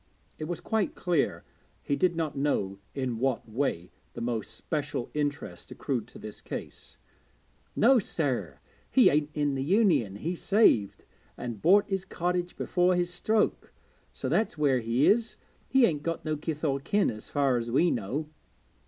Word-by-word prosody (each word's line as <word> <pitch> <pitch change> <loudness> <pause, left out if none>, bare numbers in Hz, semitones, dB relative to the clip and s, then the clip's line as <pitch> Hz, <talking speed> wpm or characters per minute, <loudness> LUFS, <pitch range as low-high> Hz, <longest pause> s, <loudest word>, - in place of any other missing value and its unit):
It 155 - -3
was 175 +1 -4
quite 220 -3 -1
clear 175 -5 0 0.4
he 140 - 0
did 175 +2 +2
not 160 -3 -2
know 100 -9 -1 0.2
in 130 -4 -2
what 130 -2 0
way 110 -7 -2 0.2
the - - -7
most 115 -2 -3
special 145 -5 -3
interest 145 0 -3
accrued 120 -6 -3
to 120 - -13
this 110 - -9
case. - - -8 0.8
'No 250 +3 +5
sir, 145 - -2 0.3
he 260 - +6
ain't 150 0 +1
in 145 -1 +1
the 135 - -2
Union; 170 - +2
he 160 - -3
saved, 175 - +2 0.3
and 120 -5 -6
bought 200 +4 +5
his 195 -2 -2
cottage 180 -1 -2
before 180 0 +2
his 175 0 -1
stroke, 215 +4 0 0.4
so - - -5
that's 220 -6 0
where 140 -4 +3
he 115 +4 +1
is. 230 +1 +2 0.3
He 265 -2 +5
ain't 150 -8 0
got 165 +2 -3
no 155 0 0
kith 150 +1 -5
or 140 -3 +1
kin, 200 +9 +1
as 110 0 -10
far 140 -3 +2
as 120 0 -3
we 165 +8 +3
know.' 125 +8 -2
150 Hz, 165 wpm, -28 LUFS, 125-180 Hz, 0.8 s, he